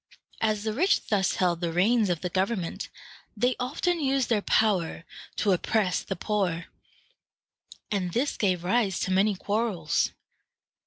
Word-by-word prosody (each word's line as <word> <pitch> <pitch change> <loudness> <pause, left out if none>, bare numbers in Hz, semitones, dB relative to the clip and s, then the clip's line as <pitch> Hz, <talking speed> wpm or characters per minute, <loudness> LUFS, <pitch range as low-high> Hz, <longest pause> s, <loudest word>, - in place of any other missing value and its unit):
As 215 -2 +1
the 220 -1 -1
rich 360 - +2
thus 195 -3 +2
held 175 -2 +1
the 170 -1 -1
reins 205 +5 +3
of 175 -3 -1
the 180 - -2
government, 190 0 -2 0.5
they 245 +4 +2
often 315 +7 0
used 270 -3 +1
their 220 -3 +2
power 190 -7 +1 0.3
to 205 - +1
oppress 190 +1 +1
the 190 - -4
poor, 180 -3 -1 1.3
and 185 -4 -1
this 260 +9 0
gave 185 -4 0
rise 195 0 +1
to 190 - -1
many 195 +2 +3
quarrels. 200 -5 0
205 Hz, 145 wpm, -27 LUFS, 180-230 Hz, 1.3 s, reins